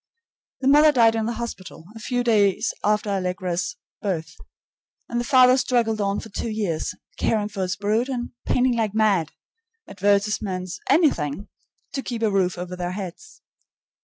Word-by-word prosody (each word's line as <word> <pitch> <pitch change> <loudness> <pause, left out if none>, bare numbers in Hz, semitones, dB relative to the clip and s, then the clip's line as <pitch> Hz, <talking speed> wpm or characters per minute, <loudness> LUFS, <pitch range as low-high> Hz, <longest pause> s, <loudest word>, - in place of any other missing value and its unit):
The 265 - 0
mother 300 +2 +7
died 230 -5 +5
in 225 -1 -1
the 235 - -1
hospital 210 -8 -7
a - - -9
few 245 +2 -1
days 215 -1 +2
after 210 0 +1
Allegra's 180 -2 -2 0.3
birth, 175 -6 -3 0.7
and 235 - -2
the - - -1
father 255 0 +6
struggled 230 -5 +1
on 200 0 0
for 225 - -9
two 225 +3 -4
years, 205 -7 -2 0.2
caring 210 -2 +1
for 200 -2 -5
his 185 0 -1
brood 215 +6 0
and 245 -2 -3 0.2
painting 250 -1 +2
like 220 -3 -1
mad 200 -7 +2 0.5
advertisements, 200 -2 0
anything 200 - +2 0.4
to 270 - -2
keep 235 -3 -4
a 215 - +2
roof 185 -2 +1
over 180 +1 -5
their 180 0 -3
heads. 200 - -8
210 Hz, 160 wpm, -23 LUFS, 185-235 Hz, 0.7 s, mother